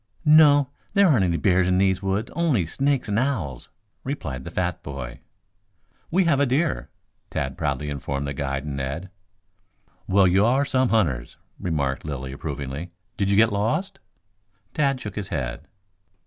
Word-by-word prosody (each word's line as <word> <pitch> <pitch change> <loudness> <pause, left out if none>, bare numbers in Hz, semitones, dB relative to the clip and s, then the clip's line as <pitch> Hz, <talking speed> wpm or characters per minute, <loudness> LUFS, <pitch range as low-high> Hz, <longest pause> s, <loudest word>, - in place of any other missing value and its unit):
"No. 150 -3 +6 0.3
There 200 -1 +6
aren't 125 - +4
any 85 -2 +1
bears 95 -2 +3
in 90 0 +2
these 95 -1 +2
woods 100 +3 -1
only 155 - +2
snakes 135 - 0
and 105 +1 +1
owls," 100 - -2 0.3
replied 70 - -4
the - - -5
fat - - -2
boy. 70 -3 -7 0.9
"We 185 +3 +3
have 160 -6 +2
a 145 - +3
deer," 145 +5 0 0.4
Tad 65 0 -3
proudly 70 0 -2
informed 70 -1 -3
the 70 - -3
guide 70 0 -3
and 70 -2 -4
Ned. 70 +8 -4 1.0
"Well, 95 +1 +4
you 95 +2 +4
are 130 +5 +3
some 130 -2 +1
hunters," 75 - 0 0.2
remarked 70 -6 -1
Lilly 65 -3 -5
approvingly. 70 +3 -5 0.3
"Did 100 -1 0
you 100 - +3
get 110 0 +5
lost?" 115 - -1 0.7
Tad 140 -4 +1
shook 105 - -7
his 105 -3 -4
head. 65 -2 -4
95 Hz, 160 wpm, -24 LUFS, -, 1.0 s, No